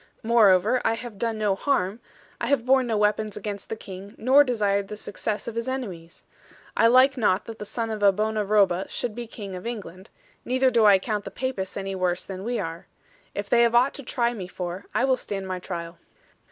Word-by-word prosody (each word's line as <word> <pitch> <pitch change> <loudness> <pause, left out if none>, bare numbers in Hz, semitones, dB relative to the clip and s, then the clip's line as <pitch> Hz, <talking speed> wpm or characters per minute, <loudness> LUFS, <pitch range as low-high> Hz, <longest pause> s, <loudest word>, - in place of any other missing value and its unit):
Moreover, 220 0 +4
I 225 - +2
have 230 -4 -8
done 230 -1 -1
no 210 -2 +1
harm; 200 -2 0 0.4
I 235 - -1
have 260 -3 +1
borne 260 -1 +4
no 225 -2 0
weapons 210 0 0
against 200 -2 -6
the - - -2
King, 195 -1 -10
nor 265 +5 +6
desired 205 -6 0
the 210 - -7
success 210 +1 -4
of 235 - -4
his 230 +2 -3
enemies. 185 -11 -6 0.5
I 230 - +5
like 260 +3 +5
not 205 -4 +2
that 225 -1 -9
the 210 - -5
son 225 +2 -3
of 215 -1 -4
a 200 -1 +6
bona 215 +2 -1
roba 195 -3 +2
should 240 -3 -3
be 240 +1 -6
King 200 -4 -8
of 180 +5 -6
England; 200 -4 -7 0.3
neither 255 +1 +2
do 230 -2 +4
I 200 -2 +8
count 210 +1 -3
the - - -6
Papists 250 -8 -4
any 195 0 -3
worse 180 -1 -1
than 190 -1 -7
we 240 +2 -2
are. 165 -3 -5 0.5
If 205 0 -3
they 235 +3 +4
have 235 0 +3
aught 255 +4 +4
to - - -7
try 240 -2 0
me 195 -6 -6
for, 180 +1 -6
I - - +1
will 260 -1 +2
stand 195 -5 -5
my 185 -1 -3
trial.' 170 -2 -6
215 Hz, 220 wpm, -25 LUFS, 195-235 Hz, 0.5 s, I